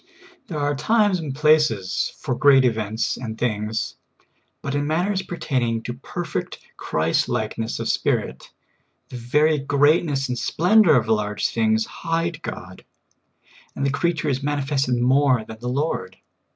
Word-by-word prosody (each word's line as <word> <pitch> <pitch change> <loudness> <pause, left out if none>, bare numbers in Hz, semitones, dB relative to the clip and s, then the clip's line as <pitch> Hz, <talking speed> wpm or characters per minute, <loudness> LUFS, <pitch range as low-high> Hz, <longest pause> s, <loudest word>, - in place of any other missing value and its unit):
There 160 - -5
are 145 0 0
times 205 +5 +2
and 145 -5 -5
places 150 -11 +2
for - - -3
great 135 0 +5
events 110 -2 -1
and 115 -3 -6
things, 110 -2 -2 0.7
but 140 - -3
in 145 0 -1
matters 185 +5 0
pertaining 125 -11 -2
to 120 - -4
perfect 165 +7 -5 0.2
Christ 80 +1 0
like 110 0 -2
ness 115 +1 -2
of - - -3
Spirit, 65 - -1 0.6
the 125 - -7
very 150 +6 +2
greatness 145 0 +2
and 125 -1 -3
splendor 180 - +4
of 115 -2 0
large 105 -1 0
things 110 -1 +2
hide 165 0 -3
God, 95 - -8 0.9
and 140 - -2
the 140 - +1
creature 160 +2 -1
is 135 -2 0
manifested 140 -2 0
more 130 -1 +3
than 110 0 -10
the 125 +1 -4
I^ord. 155 - -2
135 Hz, 145 wpm, -22 LUFS, 115-155 Hz, 0.9 s, great